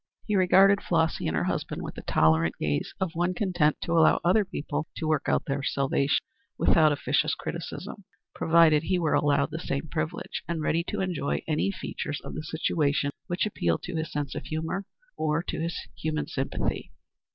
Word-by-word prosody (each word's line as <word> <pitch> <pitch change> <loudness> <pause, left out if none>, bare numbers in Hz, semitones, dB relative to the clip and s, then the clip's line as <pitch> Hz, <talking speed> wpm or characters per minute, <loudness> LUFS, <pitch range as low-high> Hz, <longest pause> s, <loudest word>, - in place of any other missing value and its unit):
He 210 - 0
regarded 195 +2 +5
Flossy 165 -2 +1
and 80 - 0
her - - +1
husband - - -2
with - - -6
the - - -8
tolerant 80 +1 +3
gaze 75 -1 -1
of 185 -3 -1
one 175 +2 0
content 175 -6 +2
to - - -3
allow 165 -1 +5
other 190 +5 +4
people 150 -4 -4
to 160 - -2
work 155 -2 +1
out - - +1
their 140 0 -1
salvation, 140 +1 +1 0.3
without 155 -2 +4
officious 145 +2 +1
criticism, 185 +4 -6 0.3
provided 160 -2 +5
he 180 +3 0
were 165 -3 +1
allowed 145 -1 +2
the 160 - -4
same 140 0 -3
privilege, 160 +1 -3
and 165 -2 -2
ready 165 +2 +1
to - - -2
enjoy 170 -7 -1
any 155 +5 +1
features 150 -6 -4
of - - -8
the - - -4
situation 150 -2 0 0.2
which 175 +2 0
appealed 85 - -1
to 175 - -5
his 160 -1 -3
sense 145 -2 -3
of - - -6
humor 160 +5 -3 0.3
or 155 +2 0
to - - -4
his 170 +1 -2 0.2
human 155 -1 -2
sympathy. 135 -3 -3
160 Hz, 185 wpm, -27 LUFS, 145-175 Hz, 0.3 s, regarded